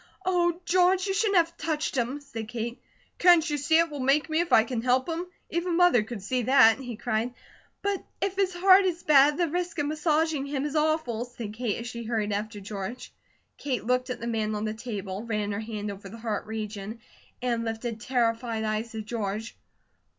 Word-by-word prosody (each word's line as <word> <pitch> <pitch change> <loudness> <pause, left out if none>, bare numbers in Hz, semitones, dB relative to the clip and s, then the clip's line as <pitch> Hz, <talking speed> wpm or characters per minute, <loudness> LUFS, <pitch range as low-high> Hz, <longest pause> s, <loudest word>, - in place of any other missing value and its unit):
"Oh, 345 -2 +2
George, 365 +2 +3
you 390 - 0
shouldn't 400 -1 +2
have 335 0 +2
touched 310 -3 -2
him," 255 +3 -1
said 230 -6 -7
Kate. 235 0 -5 0.4
"Can't 345 -2 +6
you 295 - 0
see 295 +3 +3
it 335 -1 +3
will 290 - -5
make 280 +4 +2
me, 315 - +2
if 345 0 -1
I 220 - +7
can 230 0 -3
help 255 +2 +2
him! 340 +2 -3 0.2
Even 340 +1 0
Mother 355 -10 +5
could 215 -2 -7
see 250 +5 0
that," 240 -1 +6
he 245 -3 -6
cried. 230 +2 -2 0.5
"But 400 -1 -1 0.2
if 390 -1 -1
his 385 -1 +1
heart 375 +2 +6
is 350 -2 -1
bad, 290 0 +6
the 345 - +2
risk 355 +2 -3
of 290 - 0
massaging 310 -1 0
him 280 0 -2
is 295 +1 -4
awful," 305 -7 +1
said 235 -4 -7
Kate 225 -2 -2
as - - -7
she 235 -1 -6
hurried 215 -2 -1
after 210 +1 -3
George. 200 +4 -6 0.5
Kate 260 -5 -2
looked 250 +1 +1
at 250 - -4
the 235 - -5
man 220 -2 -1
on 210 +1 -2
the 215 - -2
table, 205 -4 -5
ran 210 -3 -2
her 200 - -2
hand 215 -2 -4
over 195 0 -9
the 225 - -9
heart 220 -3 -3
region, 215 0 -5 0.4
and 240 -2 -1
lifted 225 0 -4
terrified 230 -2 0
eyes 215 +1 -2
to 220 -1 -4
George. 215 -1 -4
245 Hz, 205 wpm, -27 LUFS, 220-320 Hz, 0.5 s, I